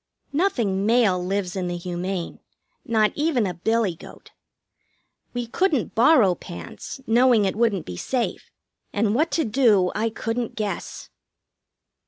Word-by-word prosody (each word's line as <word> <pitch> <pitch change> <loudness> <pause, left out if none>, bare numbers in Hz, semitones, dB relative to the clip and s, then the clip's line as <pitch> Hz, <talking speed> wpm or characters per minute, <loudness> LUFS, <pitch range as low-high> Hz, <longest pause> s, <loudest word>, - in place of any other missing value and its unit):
Nothing 235 - +1
male 220 -6 +3
lives 190 0 -2
in 185 -2 -2
the 175 0 -3
Humane. 180 0 -4 0.4
Not 215 -2 +2
even 290 -7 +1
a 185 - -2
billy 220 +2 0
goat. 165 - -14 1.0
We 245 -1 -2
couldn't 295 - 0
borrow 235 - +5
pants, 85 - -9
knowing 235 -2 +4
it 190 - -1
wouldn't 215 -6 +1
be 90 - -7
safe; 250 - -2 0.4
and 205 0 +1
what 310 +7 +2
to 320 - +1
do 215 -6 +3
I 220 +2 0
couldn't 225 +1 -3
guess. 210 -2 -5
215 Hz, 135 wpm, -23 LUFS, 185-245 Hz, 1.0 s, borrow